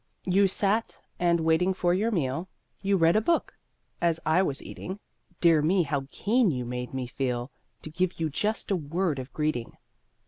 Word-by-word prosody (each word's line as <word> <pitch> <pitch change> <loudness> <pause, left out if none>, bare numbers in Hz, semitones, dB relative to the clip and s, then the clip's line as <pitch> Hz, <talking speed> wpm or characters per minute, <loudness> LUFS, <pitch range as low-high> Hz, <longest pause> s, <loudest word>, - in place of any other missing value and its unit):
You 195 +2 +4
sat, 205 +4 0 0.2
and, 170 -1 +3
waiting 165 +4 +2
for 175 -2 +2
your 210 +5 +1
meal, 165 - -1 0.3
You 195 0 +2
read 165 0 +4
a 215 - +4
book. 335 +9 +1 0.5
As 170 -1 +2
I 160 +4 +4
was 145 -7 -1
eating, 190 +2 -7 0.4
Dear 165 -3 +5
me, 175 +4 +3
how 140 -3 -2
keen 225 +4 +2
you 125 -5 -2
made 125 0 -4
me 130 -1 -3
feel 125 0 -3 0.3
To 155 - -7
give 180 +2 -1
you 160 - +1
just 210 +9 -2
a - - +4
word 165 -1 -1
of 130 +1 -7
greeting! 150 -6 -2
170 Hz, 180 wpm, -27 LUFS, 140-190 Hz, 0.5 s, Dear